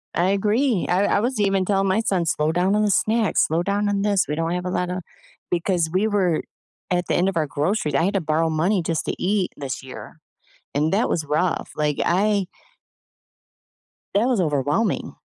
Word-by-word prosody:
I 175 +2 +2
agree. 210 +2 +1
I 180 +3 +2
I - - +2
was 240 +2 -1
even 195 -2 +2
telling 195 0 +1
my 190 +3 +2
son, 190 -6 0
“Slow 155 -1 +1
down 180 +4 +1
on 210 - +2
the 210 - +2
snacks, 220 +2 +2
slow 160 +2 0
down 200 +2 0
on 200 -1 0
this. 200 -2 +2
We 150 - -2
don't 165 +1 -1
have 180 0 -3
a - - -2
lotta 180 0 -2 0.5
"because 175 -1 0
we 190 +5 +1
were 190 -6 +1 0.5
at 180 -1 0
the - - 0
end 185 +2 +2
of 190 - -4
our 155 -2 +1
groceries. 150 +2 -1
I 165 - +3
had 195 +4 +1
to 195 - +1
borrow 160 +1 +1
money 175 +5 +1
just 165 -1 -2
to - - -2
eat 195 0 0
this 135 -2 -5
year, 130 +4 -10 0.6
and 150 +3 +1
that 215 +5 +2
was 160 - -1
rough, 155 +4 -1
like, 150 -1 0
I 200 +2 +2 1.7
that 210 +5 +3
was 245 -7 +2
overwhelming. 150 - 0
185 Hz, 200 wpm, -22 LUFS, 160-205 Hz, 1.7 s, I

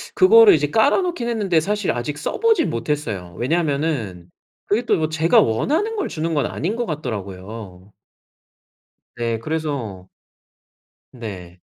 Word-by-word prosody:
그거를 435 +2 +7
이제 - - 0
깔아놓긴 350 -11 +1
했는데 200 -8 +1
사실 205 +3 -1
아직 125 +5 -4
써보진 435 - +1
못했어요. 115 - -3
왜냐하면은 140 - -1 0.4
그게 210 +4 +1
또 - - +2
뭐 155 -1 0
제가 160 +2 +4
원하는 320 - 0
걸 405 - -2
주는 160 +1 -3
건 145 - +1
아닌 195 +8 -3
거 240 -1 -2
같더라고요. 100 - -7 1.2
네 115 -1 -1
그래서 130 - -4 1.0
네. 95 -8 -9
150 Hz, 275 characters per minute, -21 LUFS, -, 1.2 s, 그거를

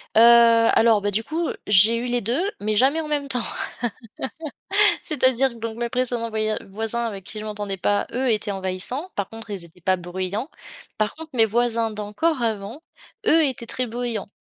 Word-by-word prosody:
Heu, 220 - +7 0.5
alors, 225 -2 +4
bah, 205 0 -1
du 215 +3 0
coup, 325 +6 -2 0.2
j'ai 210 +3 +6
eu 235 - -3
les 245 0 0
2 235 - -1 0.2
mais 215 +1 -1
jamais 265 +9 +3
en 315 - -4
même 290 -2 -2
temps. 250 -3 0 1.6
C'est-à-dire 265 -3 +2
que - - -12
donc 230 -1 -6
mes 240 0 -1
précédents 245 -2 0
voya 215 -1 -1
voisins 225 +4 -1
avec 200 -4 -5
qui 215 +3 -7
je 215 - -6
m'entendais 205 -2 -4
pas, 205 +2 +1
eux, 255 +2 0
étaient 210 -1 -1
envahissants, 195 - -1
par 200 -1 -2
contre, 225 0 -9
ils 195 -4 -2
étaient 170 +1 -16
pas 185 +2 +2
bruyants. 185 - -4 0.5
Par 215 -1 0
contre, 320 0 -9
mes 230 -3 +4
voisins 230 0 +1
d'encore 215 +9 -1
avant, 225 +5 -3 0.4
eux 325 - +5
étaient 255 -4 -3
très 250 +2 -2
bruyants. 235 -2 -4
225 Hz, 185 wpm, -23 LUFS, 205-250 Hz, 1.6 s, Heu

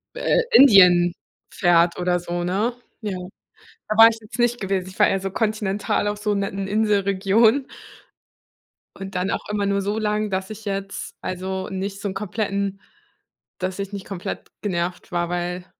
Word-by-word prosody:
äh, - - +2
Indien 180 - +7 0.4
fährt 175 -1 +3
oder 180 0 +1
so, 175 0 -3
ne? 200 +7 0 0.3
Ja, 200 -3 -3 0.7
da 215 - -1
war 225 0 +10
ich 225 - -5
jetzt 225 +3 -10
nicht 240 0 +2
gewesen. 190 -2 -1
Ich 190 - -14
war - - +6
eher 195 - +1
so 195 +1 -3
kontinental 210 -1 -1
auf 205 0 -2
so 210 0 0
netten 195 -1 -2
Inselregionen 210 +4 +2 1.3
und 195 -1 -7
dann 180 +2 0
auch - - -4
immer 205 -1 0
nur 200 0 0
so 205 +2 -2
lang, 210 0 -1
dass 190 +1 -3
ich 215 0 -9
jetzt, 195 -1 -5
also, 190 +1 -4
nicht 195 +1 -4
so 205 - -3
'n 190 - -5
kompletten 200 -1 -2 0.8
dass 185 0 -3
ich 200 0 -5
nicht 200 -1 -7
komplett 190 -3 -6
genervt 180 -3 -3
war, 175 0 0
weil 175 +1 -3
195 Hz, 165 wpm, -22 LUFS, 185-210 Hz, 1.3 s, war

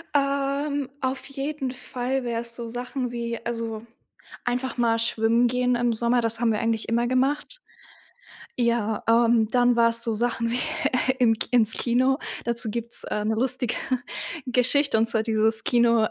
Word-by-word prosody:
Ähm, 280 0 0
auf 260 0 -2
jeden 275 0 -4
Fall 250 +1 -3
wär's 235 0 -4
so 235 -1 -6
Sachen 245 +1 -4
wie 235 -1 -4
also, 230 -1 -4 0.6
einfach 250 +1 -2
mal 230 -1 +2
schwimmen 230 +1 +2
gehen 250 +1 +1
im 240 -1 +1
Sommer, 235 +2 +1
das 230 0 0
haben 230 -1 +2
wir 210 - -1
eigentlich 225 -1 -1
immer 235 +1 +1
gemacht. 290 - -1 1.0
Ja, 235 -3 0
ähm, 230 -1 +4
dann 245 0 +3
war's 230 0 +2
so 230 - -1
Sachen 230 +1 -1
wie, 240 - -1 0.5
äh, 260 - +3
im 225 -2 +4 0.2
ins 225 -3 +5
Kino. 255 +4 +1 0.3
Dazu 235 -1 +1
gibt's, 235 +1 +1
äh, 210 - -3
'ne 220 +1 0
lustige 250 0 +1 0.7
Geschichte 255 +1 +3
und 225 - +2
zwar 225 -1 +2
dieses 220 0 +2
Kino 235 -2 +3
235 Hz, 155 wpm, -24 LUFS, 230-255 Hz, 1.0 s, ins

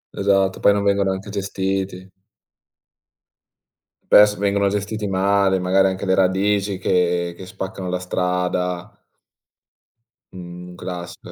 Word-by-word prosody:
Esatto, 95 -1 +1
poi 100 - +5
non 100 0 0
vengono 100 -1 +2
anche 95 +2 -6
gestiti. 95 -1 -3 2.0
Spesso 105 0 +7
vengono 100 0 +1
gestiti 105 +1 -2
male, 95 0 +2
magari 95 +1 +3
anche 95 +1 -3
le 95 - +2
radici 95 +1 +1
che 90 -2 0
che 95 - -9
spaccano 95 0 -6
la 90 0 -2
strada. 90 +1 -2 1.4
Un 90 0 -9
classico 90 -1 -8
95 Hz, 110 wpm, -21 LUFS, 90-100 Hz, 2.0 s, Spesso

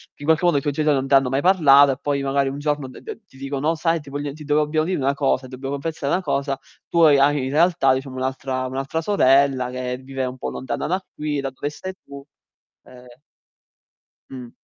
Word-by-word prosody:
che 145 - -13
in - - -5
qualche 160 +2 +2
modo 170 -5 +3
i - - 0
tuoi 145 0 -2
genitori 150 -1 +2
non 135 0 -2
t'hanno 135 -2 +4
mai 135 +2 0
parlato, 145 -7 +6
e 130 - -3
poi 140 -1 -1
magari 135 0 +1
un 140 - -6
giorno 145 -2 -2
d 130 - -12
d - - -8
ti 135 - -19
dicono: 135 +2 -2
"Oh 165 - +1
sai 165 +1 0
ti 145 - -13
voglio 145 0 -4
ti 150 0 -11
devo 150 +1 +2
dobbiamo 155 +1 0
dire 185 - -1
una 140 0 +1
cosa, 135 -2 0
ti 130 - -10
dobbiamo 135 +2 -5
confessare 145 -1 -3
una 185 +1 0
cosa, 140 -2 -1 0.3
tu 170 - 0
ha 160 - +8 0.2
hai 145 -2 0
in 135 - -3
realtà 155 -4 +3
diciamo 130 0 -4
un'altra 130 0 -3
un'altra 135 +5 -3
sorella 135 -8 +3
che 125 0 -4
vive 130 0 -5
un 125 +1 -6
po' - - -3
lontana 130 - -4
da 185 +2 -2
qui, 150 -1 -3
da 135 -1 -3
dove 145 +3 -4
stai 185 +5 -7
tu, 140 0 -11 0.6
uhm" 125 0 -15 1.2
Mh. 125 -3 -9
140 Hz, 235 wpm, -22 LUFS, 135-150 Hz, 1.2 s, ha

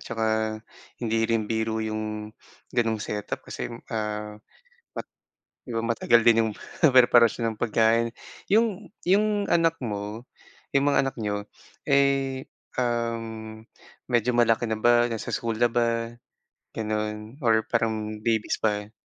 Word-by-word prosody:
tsaka 115 -1 -3 0.7
hindi 115 -1 0
rin 115 -2 +1
biro 110 +1 -1
yung 110 -1 -4 0.4
ganung 115 -2 +1
setup 105 -1 -4
kasi, - - -5 0.2
ah, 105 -1 -3 0.6
mat - - -5 0.6
'di 120 - -4
ba 115 - -1
matagal 115 0 +3
din 115 -1 +6
'yong 110 -1 0 0.4
preparasyon 120 -2 +5
ng 105 - -15
pagkain. 115 0 +3 0.4
Yung 215 -1 +2 0.2
yung 205 +2 +2
anak 165 -1 +3
mo, 105 +1 -4 0.5
'yong 140 0 +3
mga 145 - +3
anak 135 - -3
niyo, 105 -1 -2 0.4
eh, 140 -1 +2 0.3
uhm, 115 -2 -3 0.4
medyo 125 0 +2
malaki 120 -1 +3
na 110 -1 -2
ba, 120 +1 +5
nasa 110 - -5
school 115 -1 -2
na 120 - +5
ba, 115 -1 0 0.7
ganun 110 +2 -3
or 115 -5 +3
parang 110 -2 -1
babies 110 0 0
pa? 105 -1 -1
115 Hz, 130 wpm, -26 LUFS, 110-120 Hz, 0.7 s, din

